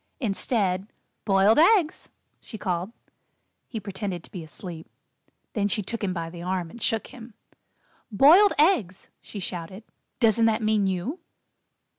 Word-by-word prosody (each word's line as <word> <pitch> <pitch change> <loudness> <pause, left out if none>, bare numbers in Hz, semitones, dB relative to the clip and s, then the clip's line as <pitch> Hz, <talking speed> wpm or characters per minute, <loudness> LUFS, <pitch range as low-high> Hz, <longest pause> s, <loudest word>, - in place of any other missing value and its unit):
Instead, 200 -4 -1 0.4
"Boiled 200 +4 +4
Eggs," 345 -2 +3 0.3
she 220 - -10
called. 180 0 -3 0.8
He 225 - -5
pretended 195 -3 -5
to - - -17
be 180 -4 -7
asleep. 165 +1 -9 0.7
Then 205 -2 0
she 205 +1 -1
took 225 +3 -5
him 195 - 0
by 165 -2 -4
the 170 0 -9
arm 180 -2 -3
and 235 - -12
shook 225 -1 0
him. 235 -4 -12 0.8
"Boiled 325 - +6
Eggs!" 250 - +2
she 205 - -9
shouted. 185 +2 -6 0.4
"Doesn't 225 -1 +3
that 220 0 +1
mean 215 -2 +2
you?" 190 - -3
205 Hz, 140 wpm, -25 LUFS, 185-230 Hz, 0.8 s, Boiled